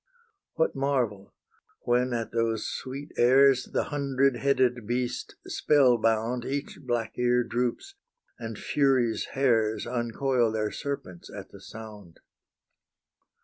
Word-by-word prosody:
What 160 Hz, -, +1 dB
marvel, 125 Hz, -8 st, -1 dB, 0.5 s
when 125 Hz, +1 st, +2 dB
at 115 Hz, -2 st, -2 dB
those 115 Hz, -1 st, 0 dB
sweet 140 Hz, +3 st, -6 dB
airs 130 Hz, +1 st, +5 dB
The -, -, -1 dB
hundred 140 Hz, -2 st, +2 dB
headed 125 Hz, -4 st, +1 dB
beast 125 Hz, +1 st, -2 dB
spell 130 Hz, -5 st, +3 dB
bound 115 Hz, +2 st, +1 dB
Each 140 Hz, +3 st, -4 dB
black 120 Hz, -4 st, -2 dB
ear 125 Hz, 0 st, +3 dB
droops, 125 Hz, -, -2 dB, 0.5 s
and 115 Hz, -2 st, -6 dB
Furies' 130 Hz, -5 st, +1 dB
hairs 115 Hz, -5 st, +2 dB
Uncoil 120 Hz, 0 st, 0 dB
their 110 Hz, -1 st, -1 dB
serpents 140 Hz, -, -6 dB
at -, -, -9 dB
the -, -, -13 dB
sound? 105 Hz, -6 st, -11 dB
120 Hz, 115 wpm, -27 LUFS, 115-135 Hz, 0.5 s, airs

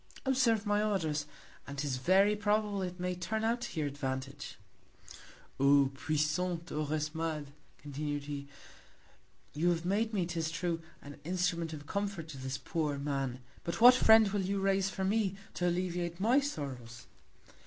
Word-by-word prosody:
Observe 245 Hz, -5 st, +2 dB
my 205 Hz, 0 st, +2 dB
Orders, 160 Hz, -8 st, 0 dB, 0.4 s
and 140 Hz, 0 st, -7 dB
'tis 140 Hz, -2 st, -1 dB
very 190 Hz, +9 st, +4 dB
probable 210 Hz, -1 st, +1 dB
it 180 Hz, -1 st, -4 dB
may 180 Hz, 0 st, -1 dB
turn 210 Hz, +5 st, -3 dB
out 235 Hz, +2 st, +1 dB
to 175 Hz, -, -4 dB
your 150 Hz, -, 0 dB
Advantage. 135 Hz, +1 st, -5 dB, 1.0 s
O 140 Hz, 0 st, +5 dB
puissant 155 Hz, +5 st, -1 dB
Orosmades, 155 Hz, 0 st, -2 dB, 0.3 s
continu'd 145 Hz, 0 st, -4 dB
he, 140 Hz, -1 st, -6 dB, 1.1 s
you 165 Hz, +4 st, +2 dB
have 170 Hz, -1 st, 0 dB
made 215 Hz, +4 st, +1 dB
me, 195 Hz, -5 st, 0 dB
'tis 165 Hz, -2 st, -2 dB
true, 165 Hz, 0 st, -2 dB, 0.2 s
an 145 Hz, 0 st, -10 dB
Instrument 175 Hz, -1 st, -1 dB
of 150 Hz, -2 st, -8 dB
Comfort 200 Hz, -2 st, -3 dB
to 140 Hz, -4 st, -8 dB
this 130 Hz, 0 st, -3 dB
poor 150 Hz, -2 st, -2 dB
Man; 135 Hz, -3 st, -2 dB, 0.2 s
but 170 Hz, -, -3 dB
what 245 Hz, +2 st, +10 dB
Friend 220 Hz, -3 st, +7 dB
will 200 Hz, 0 st, 0 dB
you 195 Hz, +1 st, -1 dB
raise 195 Hz, 0 st, +2 dB
for 190 Hz, 0 st, -4 dB
me, 200 Hz, -1 st, +1 dB, 0.2 s
to 180 Hz, -, 0 dB
alleviate 175 Hz, -1 st, -1 dB
my 235 Hz, +7 st, +4 dB
Sorrows? 130 Hz, -, -5 dB
170 Hz, 155 wpm, -32 LUFS, 145-200 Hz, 1.1 s, what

